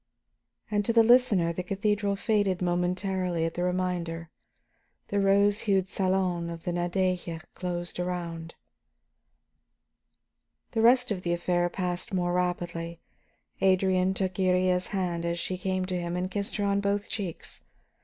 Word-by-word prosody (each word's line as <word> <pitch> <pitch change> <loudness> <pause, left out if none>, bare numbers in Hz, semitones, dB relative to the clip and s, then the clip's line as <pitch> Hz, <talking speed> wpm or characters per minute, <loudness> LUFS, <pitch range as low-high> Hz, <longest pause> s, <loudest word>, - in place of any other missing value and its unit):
And 205 -1 +2
to 230 - +2
the 230 0 +6
listener 220 -8 +4
the 180 - -3
cathedral 200 +2 0
faded 205 -3 +1
momentarily 180 -1 0
at 165 - -2
the 175 - -3
reminder; 175 -2 -2 0.8
the 205 - +1
rose 200 +1 +4
hued 190 -1 +3
salon 185 -3 0
of 165 -1 -7
the 175 - -2
Nadeja 175 -1 -1
closed 175 -1 -4
around. 170 -2 -4 2.2
The 225 - 0
rest 245 +1 +5
of 190 -3 -1
the 175 -1 0
affair 175 0 +1
passed 180 +3 -3
more 175 -1 0
rapidly. 175 -2 -2 0.6
Adrian 190 0 +3
took 190 -1 0
Iría's 185 -1 +2
hands 180 -4 -2
as 170 0 -1
she 185 +2 -2
came 185 0 -1
to 185 -1 -2
him 170 0 -3
and 180 +1 -2
kissed 200 +1 -2
her 205 - -1
on 200 0 +1
both 200 0 0
cheeks. 190 -6 -5
185 Hz, 145 wpm, -28 LUFS, 175-195 Hz, 2.2 s, the